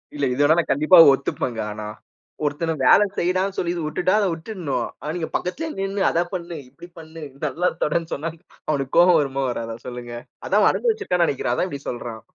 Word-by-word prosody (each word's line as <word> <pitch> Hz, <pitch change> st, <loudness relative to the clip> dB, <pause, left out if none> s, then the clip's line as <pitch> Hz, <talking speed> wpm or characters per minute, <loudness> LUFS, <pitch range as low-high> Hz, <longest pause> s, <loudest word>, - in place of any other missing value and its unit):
இல்ல. 145 Hz, -, 0 dB
இது 140 Hz, -, -1 dB
வேணா, 155 Hz, +3 st, +5 dB
நான் -, -, -2 dB
கண்டிப்பா 155 Hz, +5 st, +5 dB, 0.2 s
ஒத்துப்பேன்ங்க 125 Hz, -4 st, -3 dB
ஆனா. 105 Hz, 0 st, -6 dB, 0.6 s
ஒருத்தன 160 Hz, +3 st, -1 dB
வேலை 205 Hz, -, +7 dB
செய்டான்னு 185 Hz, +2 st, 0 dB
சொல்லி 170 Hz, -1 st, -1 dB, 0.2 s
விட்டுட்டா, 175 Hz, +5 st, 0 dB
அத 200 Hz, -, +2 dB
விட்டுடணும். 160 Hz, -, -4 dB
ஆனா, 150 Hz, -, -4 dB
நீங்க 165 Hz, -, -4 dB
பக்கத்திலேயே 310 Hz, -, -3 dB
நின்னு 195 Hz, 0 st, -2 dB
அத 170 Hz, -, +1 dB
பண்ணு, 170 Hz, -2 st, -5 dB
இப்டி 170 Hz, +6 st, -13 dB
பண்ணு, 160 Hz, 0 st, -10 dB, 0.2 s
நல்லா 180 Hz, +2 st, 0 dB
தொடைன் 165 Hz, +2 st, -1 dB
சொன்னா 160 Hz, +4 st, -3 dB, 0.4 s
அவனுக்கு 135 Hz, -3 st, -1 dB
கோவம், 175 Hz, -2 st, +6 dB
வருமா 135 Hz, -1 st, -2 dB
வராத 115 Hz, -1 st, -4 dB
சொல்லுங்க? 120 Hz, -1 st, -7 dB, 0.3 s
அதான் -, -, +3 dB
அவன் -, -, +5 dB
அனுபவிச்சுருக்கான் 425 Hz, -, +1 dB
நெனைக்கிறேன், 130 Hz, -5 st, -1 dB
அதான் 185 Hz, -, -1 dB
இப்டி 140 Hz, -2 st, -6 dB
சொல்றான். 120 Hz, -2 st, -6 dB
160 Hz, 180 wpm, -22 LUFS, 135-180 Hz, 0.6 s, வேலை